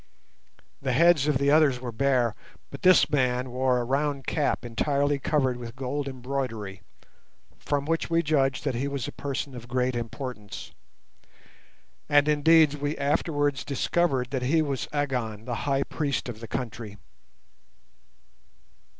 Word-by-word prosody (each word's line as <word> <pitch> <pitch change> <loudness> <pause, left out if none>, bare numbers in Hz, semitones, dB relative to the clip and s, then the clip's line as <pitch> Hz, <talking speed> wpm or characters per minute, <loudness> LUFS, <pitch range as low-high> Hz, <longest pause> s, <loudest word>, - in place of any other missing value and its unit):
The 130 -2 -1
heads 165 0 +5
of 150 -3 +3
the 140 +1 +2
others 150 -5 +4
were 125 -1 -5
bare, 125 -1 +1 0.4
but 140 - -9
this 185 -1 +6
man 125 -3 +1
wore 130 0 +1
a - - -1
round 140 +2 -1
cap 145 -4 0
entirely 140 +4 0
covered 130 -3 +1
with 120 -1 -8
gold 135 +2 -3
embroidery, 125 -7 -4 0.8
from 145 -1 -1
which 165 +1 -1
we 165 0 +2
judged 135 -4 +1
that 140 - 0
he 125 +4 -2
was 140 -4 -3
a - - -5
person 140 0 -4
of 120 -1 -9
great 125 0 0
importance; 120 -3 -6 1.4
and 145 0 +5
indeed 150 0 +5
we 145 +1 -3
afterwards 145 -1 0
discovered 135 -2 0
that 130 -2 -1
he 155 +6 +2
was 140 -3 -3
Agon, 125 -7 -2
the 120 -2 -3
High 135 0 +2
Priest 140 -4 -2
of 115 -3 -6
the 115 - -8
country. 115 -4 -5
135 Hz, 145 wpm, -26 LUFS, 125-145 Hz, 1.4 s, this